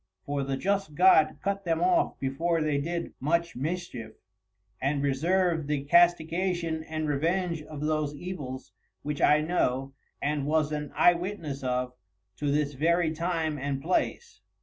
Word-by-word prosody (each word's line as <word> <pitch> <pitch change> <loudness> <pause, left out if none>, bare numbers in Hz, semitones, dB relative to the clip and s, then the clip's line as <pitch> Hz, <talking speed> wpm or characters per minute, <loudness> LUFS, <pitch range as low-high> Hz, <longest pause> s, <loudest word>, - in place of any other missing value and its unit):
For 145 0 -2
the 135 0 -2
Just 195 -3 -1
God 175 -3 +5
cut 200 0 -1
them 165 -3 0
off 180 +2 +2
before 165 +5 0
they 150 -2 +1
did 170 +3 -3
much 170 +4 0
Mischief, 135 -6 -4 0.7
and 140 +1 0
reserv'd 165 +3 +1
the 145 -2 -1
Castigation 170 +1 +2
and 155 -1 -3
Revenge 165 +3 0
of 150 -1 -9
those 150 -1 -1
Evils 145 -6 -6 0.3
which 150 0 -3
I 150 +1 +5
know, 135 -5 0 0.3
and 145 -1 -1
was 155 -1 +1
an 150 -1 -3
Eye 175 - +6
Witness 170 -6 -5
of, 125 0 -1 0.4
to 145 - -1
this 145 0 0
very 165 +4 +2
Time 160 -2 -1
and 140 0 -2
Place. 185 - -2
155 Hz, 150 wpm, -28 LUFS, 140-175 Hz, 0.7 s, Eye